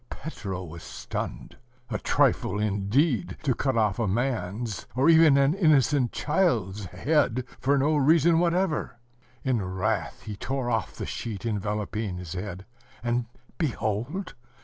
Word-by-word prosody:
Petro 100 - -6
was 85 -1 -9
stunned. - - -6 0.3
A - - -1
trifle, 105 - +2
indeed, 105 - +1
to 135 - +2
cut 130 0 0
off 105 -2 +2
a 115 - +1
man's, 110 -1 -2
or 135 +5 +4
even 160 -3 +7
an 140 +2 +4
innocent 145 - +3
child's, 115 - 0
head 125 - +1
for 140 +2 +2
no 145 +3 +2
reason 160 +3 +5
whatever! 175 -6 0 0.5
In 125 -4 +1
wrath 95 0 -2
he 105 - -6
tore 130 +3 -2
off 110 -3 -1
the - - -5
sheet 110 -2 -5
enveloping 105 -2 -2
his 90 -2 -6
head, 95 0 -6 0.4
and 120 0 0 0.3
behold! 135 - -2
120 Hz, 135 wpm, -27 LUFS, 100-145 Hz, 0.5 s, even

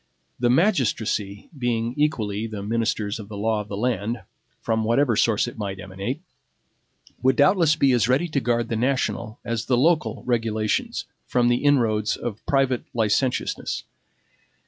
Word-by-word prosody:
The 120 0 +2
magistracy, 120 - +1
being 120 -3 -1
equally 110 -8 0
the 105 -3 -6
ministers 110 -1 -1
of 105 -1 -9
the 105 - -7
law 110 +1 0
of 105 - -10
the 100 - -5
land, 115 0 -1 0.4
from 110 -1 0
whatever 120 +2 +2
source 110 +1 +2
it 120 - -8
might 100 -2 -4
emanate, 100 - -5 1.0
would 130 0 +3
doubtless 160 +2 +4
be 140 -3 +3
as 120 -2 +2
ready 135 +8 +2
to 150 - 0
guard 120 -2 0
the 115 - -1
national 120 -2 -1
as 115 -2 -2
the 125 - +2
local 155 +4 +2
regulations 110 -3 -1 0.2
from 120 -1 +2
the 120 - +3
inroads 115 -7 +2
of 110 -3 -5
private 135 -3 +2
licentiousness. 115 +3 0
115 Hz, 150 wpm, -24 LUFS, 110-130 Hz, 1.0 s, doubtless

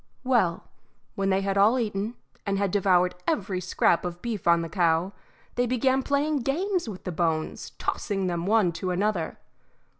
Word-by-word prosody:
Well, 230 -10 +2 0.5
when 195 0 -1
they 190 0 +2
had 195 0 0
all 215 +6 +5
eaten, 215 -1 -2 0.3
and 200 -1 -1
had 200 -1 0
devoured 180 -2 +3
every 190 -2 -1
scrap 175 -1 +2
of 175 -1 -5
beef 220 -5 -4
on 170 0 +5
the - - -4
cow, 170 +2 +1 0.4
they 245 0 +1
began 260 +2 +2
playing 285 +2 +1
games 335 - -1
with 190 -3 -8
the 180 - -4
bones, 160 -2 -1
tossing 195 -3 -2
them 175 0 -2
one 210 -4 +3
to 185 +3 -4
another. 180 -2 -1
195 Hz, 170 wpm, -26 LUFS, 175-235 Hz, 0.5 s, all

